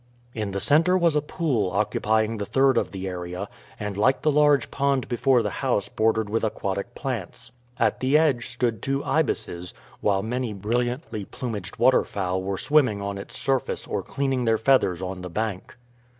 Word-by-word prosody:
In 105 -3 -3
the 100 0 -3
center 165 - +4
was 170 -4 +2
a 150 - +3
pool 140 - -1
occupying 110 +3 +1
the 100 - -3
third 135 -1 +3
of - - +1
the 95 -1 -5
area, 90 +1 -5 0.3
and 105 -2 -4
like 125 +7 +2
the 155 - +4
large 145 -1 +3
pond 140 -2 0
before 125 0 +2
the - - -2
house 125 -6 0
bordered 110 -1 +1
with 115 +2 -1
aquatic 100 +1 -3
plants. 120 - -5 0.3
At - - +1
the 135 +3 +3
edge 145 -7 +2
stood 120 -3 -1
two 135 +1 -1
ibises, 110 - -1 0.2
while 100 -2 +1
many 120 0 -2
brilliantly 120 - -2
plumaged 105 -7 -6
waterfowl 95 -7 +2
were 95 +1 -3
swimming 135 -8 +2
on 100 0 -4
its 120 +6 -9
surface 135 -3 -1
or - - -2
cleaning 135 -3 -1
their 115 -1 +3
feathers 110 -8 +2
on 95 0 -5
the 90 - -6
bank. 105 +3 -4
115 Hz, 175 wpm, -25 LUFS, 100-135 Hz, 0.3 s, center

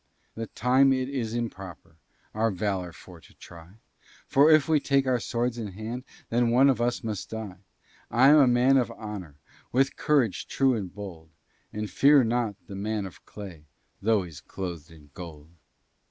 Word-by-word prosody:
"The 115 0 -5
time 130 +5 +3
it 130 -1 0
is 120 -5 -3
improper 95 -8 -6 0.4
Our 110 +1 +1
valor 95 -3 -2
for 85 0 -14
to - - -20
try, 85 +1 -14 0.5
For 145 +3 +4
if 155 -1 +5
we 155 -2 +3
take 140 -1 +1
our 130 -2 +1
swords 120 +1 -2
in 105 -4 -5
hand, 115 +5 -6 0.2
Then 120 0 +2
one 130 +4 +5
of 120 -3 -2
us 120 +1 0
must 105 -4 -4
die; 105 -5 -7 0.5
I 125 +4 +5
am 150 - +7
a 140 -3 +6
man 125 +2 +4
of 125 - +1
honor, 100 -9 -8 0.4
With 135 +2 +1
courage 140 - +1
true 135 -1 +2
and 100 -6 -4
bold, 90 -5 -9 0.4
And 105 - -4
I - - -1
fear 140 +5 +5
not 115 -2 0
the 100 - -10
man 105 +1 -3
of 95 - -11
clay, 90 -7 -10 0.4
Although 110 -1 +2
he's 80 -6 -10
cloth'd 85 -3 -7
in 75 -3 -17
gold." 80 -3 -10
110 Hz, 180 wpm, -27 LUFS, 95-125 Hz, 0.5 s, am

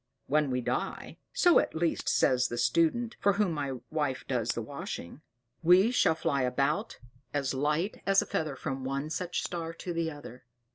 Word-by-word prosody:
When 150 0 +2
we 125 0 0
die - - -3
so 355 -8 +5
at - - -2
least 165 0 0
says 125 -1 +3
the 120 - -5
student, 170 - +1
for 200 - +3
whom 200 -2 +1
my 145 -4 -2 0.2
wife 145 -4 -1
does 120 -3 -1
the 115 - 0
washing 135 - -7 0.4
we 180 +7 +6
shall 180 -10 +3
fly 140 -3 0
about 130 +2 0 0.4
as 140 -2 0
light 150 +8 -1
as 195 0 +5
a - - 0
feather 155 -3 -2
from 135 0 -4
one 140 +3 -3
such 180 +2 -2
a - - -6
star 165 -1 -4
to 175 +1 -5
the 165 -1 -1
other. 145 -4 -10
150 Hz, 185 wpm, -30 LUFS, 135-170 Hz, 0.4 s, we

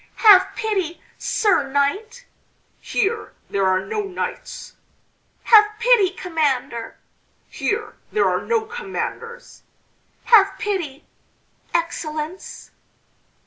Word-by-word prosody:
"Have 405 -4 +7
pity, 385 -7 -2 0.2
Sir 425 -9 +1
Knight!" 420 - -1 0.5
"Here 430 +3 -2 0.2
there 195 -1 +1
are 185 0 +1
no 435 -1 -2
knights!" 390 -3 -6 0.7
"Have 425 -2 +7
pity, 470 -5 +4
Commander!" 280 -11 -2 0.5
"Here 425 +1 -3 0.2
there 430 - +2
are - - 0
no 455 -1 0
commanders!" 470 +2 -6 0.6
"Have 395 -4 +5
pity, 340 -9 -4 0.7
Excellence!" 330 0 -4
395 Hz, 90 wpm, -21 LUFS, 315-445 Hz, 0.7 s, Have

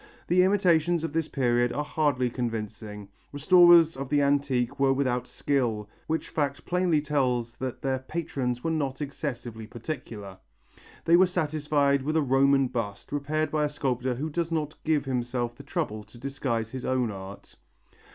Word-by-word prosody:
The 180 +2 +4
imitations 175 -4 +3
of 165 - -3
this 165 -1 0
period 120 -3 +1
are 145 +5 -2
hardly 145 -5 0
convincing. 110 -4 -5 0.2
Restorers 170 +2 +6
of 135 0 -5
the 145 -1 +3
antique 140 -4 +1
were 135 -1 +4
without 125 -2 0
skill, 120 -7 -1 0.2
which 160 +1 -2
fact 140 -2 -2
plainly 180 -3 +2
tells 125 -5 0
that 130 -1 -5
their 135 -1 0
patrons 130 -4 -3
were 165 - 0
not 140 -4 -2
excessively 120 -6 -5
particular. 115 -6 -7 0.7
They 170 +1 +6
were 185 +1 +6
satisfied 150 -5 +1
with 155 +4 0
a - - +4
Roman 135 +1 +4
bust, 110 -5 -5
repaired 150 +2 -1
by 155 -1 +1
a 150 - +1
sculptor 130 -3 -1
who 155 +5 -4
does 165 +1 -2
not 155 -2 -1
give 155 -2 +1
himself 120 -2 -2
the - - -11
trouble 140 -8 -3
to 105 +3 -17
disguise 120 -4 -3
his 130 -1 -6
own 125 -3 0
art. 95 0 -10
140 Hz, 160 wpm, -27 LUFS, 120-155 Hz, 0.7 s, Restorers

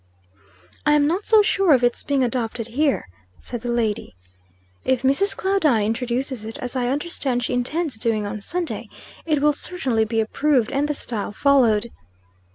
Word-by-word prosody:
"I 295 - +3
am 295 -1 +4
not 355 +7 -1
so 435 -2 +6
sure 390 -5 +3
of 250 - 0
its 240 0 +1
being 280 -2 0
adopted 235 -2 -2
here," 275 - 0 0.3
said 240 -2 -6
the 240 - -4
lady. 220 - -1 0.7
"If 260 -1 0
Mrs. 275 +10 +2
Claudine 320 - +2
introduces 245 +2 -2
it, 225 +1 -7
as 250 +1 -6
I 250 -1 0
understand 270 -3 -1
she 250 - -2
intends 275 +3 -1
doing 220 -2 0
on 205 +1 -5
Sunday, 345 - -4 0.4
it 300 -3 +1
will 300 0 +4
certainly 265 -9 -1
be 225 +1 -1
approved 250 +2 +1
and 280 +2 0
the 295 - -1
style 220 -7 -3
followed." 235 -3 +3
255 Hz, 165 wpm, -22 LUFS, 230-295 Hz, 0.7 s, so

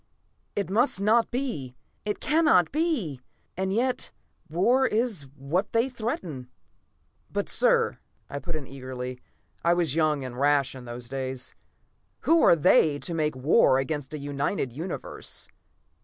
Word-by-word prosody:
It 200 -2 -2
must 225 -1 +2
not 220 +3 +3
be. 235 - -3 0.3
It 210 - -2
cannot 300 - +4
be! 270 - -1 0.3
And 190 +1 -1
yet, 245 +5 0 0.4
war 240 +11 +3
is 215 - -1
what 155 +9 -2
they 230 +3 +3
threaten." 185 - -4 0.8
"But, - - -1
sir!" - - +2 0.3
I 140 - -5
put 170 +2 -5
in 150 -3 -4
eagerly. 130 -1 -6 0.4
I 170 +1 +4
was 170 -6 +1
young 155 -4 +1
and 125 0 -7
rash 140 -1 +3
in 130 -2 -10
those 120 0 -7
days. 130 0 -4 0.7
"Who 330 0 +4
are - - +7
they, 155 -2 +4
to 170 - -3
make 155 -3 0
war 130 - +4
against 135 +1 -2
a - - -3
united 140 -1 -2
Universe?" 165 +8 -5
155 Hz, 140 wpm, -27 LUFS, 135-215 Hz, 0.8 s, are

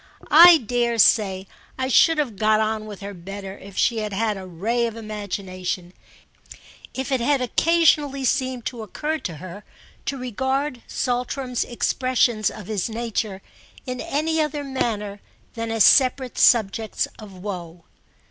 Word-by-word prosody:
I 340 +2 +10
dare 240 -2 -1
say 195 -3 +3 0.3
I 260 0 -1
should 325 +5 +5
have 275 -8 -1
got 215 +2 +2
on 215 0 -1
with 205 -2 -9
her 200 +1 -6
better 195 +2 -8
if 195 -1 -12
she 235 -2 +2
had 210 -1 -4
had 215 +1 0
a 190 -1 -8
ray 225 +8 -1
of 225 - -7
imagination—if 200 +4 -7
it 260 -2 +1
had 280 +3 +2
occasionally 290 0 +2
seemed 255 -2 -1
to 240 -3 -4
occur 300 +9 -3
to 170 - -5
her 185 +5 -9 0.4
to 275 - -2
regard 265 +2 -2
Saltram's 250 0 -2
expressions 240 -3 +1
of 210 - -10
his 210 0 -2
nature 220 -4 -3 0.4
in 255 -1 -4
any 315 +3 0
other 300 -1 -2
manner 215 -7 -3 0.3
than 230 0 -4
as 225 -2 +3
separate 260 0 +4
subjects 220 -2 +3
of 210 -3 -11
woe. 180 -3 -7
230 Hz, 145 wpm, -23 LUFS, 200-260 Hz, 0.4 s, I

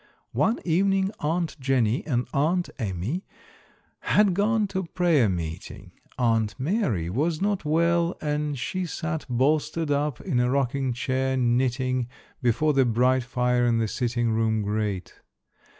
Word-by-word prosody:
One 225 +2 +2
evening 195 +3 +2
Aunt 165 +2 -1
Jenny 130 -3 +1
and 125 -4 0
Aunt 170 +6 +1
Amy 110 - -3 0.8
had 205 -3 +3
gone 210 +3 +2
to 190 -1 -2
prayer 165 - +2
meeting. 85 -3 -5 0.3
Aunt 115 -3 +1
Mary 135 - 0
was 155 - -1
not 200 -3 -1
well 170 +3 +2
and 150 -1 -2
she 185 +7 -3
sat 160 -1 -4
bolstered 150 +5 +1
up 145 -2 0
in 145 -10 -1
a 125 0 +2
rocking 135 0 0
chair, 130 +2 -1
knitting, 125 0 +1 0.3
before 135 +6 +2
the 135 -1 +4
bright 125 +2 +2
fire 125 0 0
in 115 -1 +2
the 115 -1 +1
sitting 120 0 -1
room 110 -1 +1
grate. 105 -2 -3
135 Hz, 135 wpm, -25 LUFS, 120-165 Hz, 0.8 s, the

